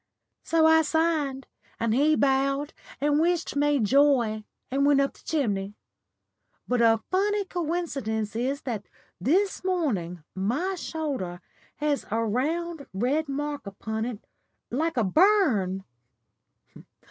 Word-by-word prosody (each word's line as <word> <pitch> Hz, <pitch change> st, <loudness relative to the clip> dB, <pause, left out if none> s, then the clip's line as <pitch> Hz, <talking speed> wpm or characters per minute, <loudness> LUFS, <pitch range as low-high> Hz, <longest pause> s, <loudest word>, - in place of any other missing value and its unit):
So 325 Hz, -1 st, +2 dB
I 320 Hz, 0 st, +6 dB
signed, 305 Hz, -4 st, 0 dB, 0.3 s
and 230 Hz, -1 st, +1 dB
he 295 Hz, +5 st, +4 dB
bowed 275 Hz, +1 st, +1 dB, 0.3 s
and 290 Hz, +1 st, +2 dB
wished 340 Hz, -1 st, +1 dB
me 290 Hz, 0 st, +3 dB
joy 240 Hz, -2 st, +3 dB, 0.3 s
and 275 Hz, +1 st, +1 dB
went 285 Hz, -1 st, +5 dB
up 275 Hz, 0 st, +1 dB
the -, -, -20 dB
chimney. 205 Hz, -10 st, -1 dB, 0.9 s
But 250 Hz, -1 st, +1 dB
a 225 Hz, -1 st, +4 dB
funny 405 Hz, +2 st, +1 dB
coincidence 295 Hz, -, -2 dB
is 265 Hz, +5 st, -1 dB
that 225 Hz, -6 st, -4 dB, 0.3 s
this 370 Hz, -, +1 dB
morning 215 Hz, -, -1 dB
my 250 Hz, -, -1 dB
shoulder 285 Hz, -, -4 dB, 0.4 s
has 295 Hz, -1 st, -1 dB
a 225 Hz, +2 st, 0 dB
round 310 Hz, +7 st, -2 dB
red 280 Hz, +9 st, 0 dB
mark 290 Hz, -3 st, -3 dB
upon 220 Hz, +3 st, -4 dB
it 235 Hz, -4 st, -6 dB, 0.5 s
like 315 Hz, +4 st, -1 dB
a 235 Hz, -, +3 dB
burn." 215 Hz, -, +3 dB
280 Hz, 125 wpm, -26 LUFS, 225-320 Hz, 0.9 s, I